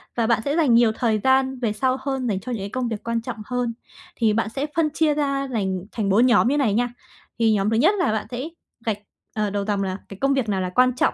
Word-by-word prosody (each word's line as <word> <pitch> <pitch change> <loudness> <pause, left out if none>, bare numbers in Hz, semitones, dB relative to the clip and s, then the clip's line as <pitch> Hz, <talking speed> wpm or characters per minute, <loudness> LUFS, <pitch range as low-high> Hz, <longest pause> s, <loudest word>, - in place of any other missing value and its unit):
và 230 -2 +1
bạn 230 -1 +2
sẽ 285 - 0
dành 305 -8 +3
nhiều 230 -1 +5
thời 220 -1 0
gian 265 0 +2
về 230 -4 0
sau 255 +4 0
hơn 265 -2 -2
dành 200 -4 0
cho 250 - -7
những 225 -5 -3
cái 200 - -4
công 250 +2 -2
việc 220 -3 -4
quan 230 0 -1
trọng 235 0 -6
hơn. 245 0 -2 0.4
Thì 225 -3 +2
bạn 220 0 0
sẽ 275 +5 -3
phân 320 -2 +2
chia 310 0 +2
ra 275 -2 -1
lành 190 -5 -2
thành 210 -4 -2
4 215 +6 +5
nhóm 235 -2 +4
như 285 +3 +2
này 250 -8 +2
nha. 245 +3 +1 0.5
Thì 225 -1 +4
nhóm 200 0 +1
thứ 225 - +1
nhất 310 - +4
là 355 - +2
bạn 215 -1 -2
sẽ 255 +6 -4 0.4
gạch, 220 -3 0 0.4
à, 210 -1 -1
đầu 200 0 -2
dòng 200 -1 0
là 190 -1 -3
cái 195 - -9
công 275 0 +3
việc 260 -5 0
nào 195 -2 0
là 185 - -2
quan 255 +7 +3
trọng - - +2
235 Hz, 275 wpm, -23 LUFS, 210-265 Hz, 0.5 s, nhiều